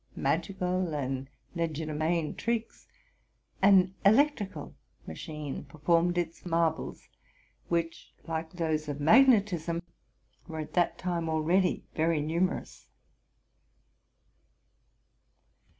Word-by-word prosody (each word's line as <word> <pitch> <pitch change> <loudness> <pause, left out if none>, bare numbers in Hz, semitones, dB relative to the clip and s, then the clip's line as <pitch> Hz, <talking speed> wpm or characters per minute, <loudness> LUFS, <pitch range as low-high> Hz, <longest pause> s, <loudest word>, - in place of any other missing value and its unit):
magical 185 -3 -1
and 135 -1 -3 0.3
legerdemain 160 0 -1
tricks, 230 0 -3 0.7
an 190 -2 +5
electrical 220 -1 +2 0.3
machine 150 -4 -6
per. 155 - -15
formed 170 +3 +2
its 170 -1 -3
marvels, 165 -2 -1 0.6
which, 165 -1 -2
like 160 0 -4
those 160 -3 -1
of 145 0 -4
magnetism, 175 - +4 0.7
were 160 -2 -6
at 155 -1 -6
that 175 -2 +2
time 170 -3 -2
already 170 +4 +1
very 160 0 +1
numerous. 170 +5 -2
170 Hz, 85 wpm, -29 LUFS, 155-185 Hz, 0.7 s, an